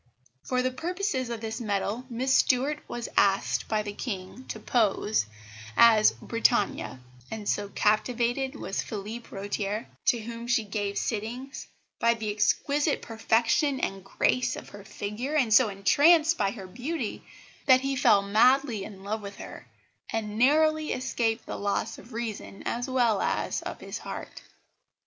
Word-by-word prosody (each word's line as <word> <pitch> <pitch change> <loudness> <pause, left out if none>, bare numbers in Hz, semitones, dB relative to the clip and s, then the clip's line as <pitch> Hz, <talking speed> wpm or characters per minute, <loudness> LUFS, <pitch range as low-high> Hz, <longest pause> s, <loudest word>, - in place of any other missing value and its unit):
For 250 -1 -1
the 255 - +1
purposes 325 - -2
of 230 -2 -4
this 225 +1 -4
medal 210 +3 -2
Miss 255 +3 0
Stuart 270 +4 +3
was 240 -1 -4
asked 195 0 +2
by 215 -1 0
the 205 -1 -5
King 205 +2 -6
to - - -5
pose 215 - +1 0.5
as 225 -2 +7
Britannia; 230 - 0 0.3
and 215 -2 -6
so 205 -1 0
captivated 240 +6 +1
was 195 - -3
Phillipe 220 +3 -6
Rotier, 205 +2 -3 0.2
to 240 - +5
whom 235 +1 -7
she 240 -2 +2
gave 205 -1 -3
sittings, 240 +5 -4 0.3
by 235 0 +3
the 220 -2 -3
exquisite 280 +8 +1
perfection 230 +5 +1
and 195 -1 -3
grace 245 +5 +1
of - - -9
her 205 -1 -11
figure, 215 +10 -4
and 250 -8 +3
so 225 0 +6
entranced 305 - +4
by 200 -2 +1
her 195 -2 -7
beauty, 245 - -4 0.4
that 260 -1 +7
he 275 0 -1
fell 225 -7 +4
madly 230 +2 +3
in 195 -2 -10
love 215 +2 -3
with 200 -1 -8
her, - - -10 0.4
and 215 -1 -3
narrowly 310 +4 +3
escaped 230 -2 -1
the - - -5
loss 200 0 -2
of 245 - -15
reason 225 -4 -5
as 245 +2 -2
well 240 -5 +2
as - - -1
of - - -6
his - - -6
heart. - - -7
230 Hz, 155 wpm, -27 LUFS, 205-255 Hz, 0.5 s, as